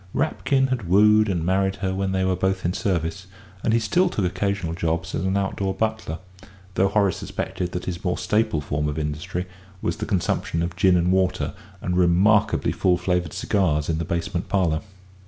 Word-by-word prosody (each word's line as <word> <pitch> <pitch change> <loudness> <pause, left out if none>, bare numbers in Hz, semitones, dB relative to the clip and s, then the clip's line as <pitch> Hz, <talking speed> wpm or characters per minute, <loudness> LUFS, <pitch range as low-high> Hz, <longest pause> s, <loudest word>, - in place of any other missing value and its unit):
Rapkin 135 -3 +1
had 120 -9 -2
wooed 105 +2 +5
and 85 -4 -1
married 95 +1 +1
her 95 -1 -2
when 95 0 -1
they 95 0 0
were 95 0 +1
both 95 0 -1
in 90 - +1
service, 90 -2 -2 0.4
and - - +2
he 115 - +4
still 175 +12 +2
took 105 - -1
occasional 95 -2 -1
jobs 85 0 -2
as - - -1
an 95 +1 +1
outdoor 95 0 -1
butler, 110 -7 -2 0.6
though 95 +1 +3
Horace 100 -2 +2
suspected 90 -1 -4
that 90 - -4
his 85 -2 -4
more 90 -2 0
staple 110 -7 +1
form 75 +1 -1
of 75 - -4
industry 80 +4 -3 0.3
was 85 - -2
the - - -4
consumption 85 -4 0
of 85 0 -4
gin 95 -1 +4
and 90 +1 +2
water 95 0 +1 0.3
and 90 - -1
remarkably 90 +4 +3
full 90 -1 +2
flavoured 90 -2 -1
cigars 80 -7 0
in 80 -1 0
the - - -1
basement 85 +1 -3
parlour. 85 -6 +1
95 Hz, 190 wpm, -24 LUFS, 85-100 Hz, 0.6 s, wooed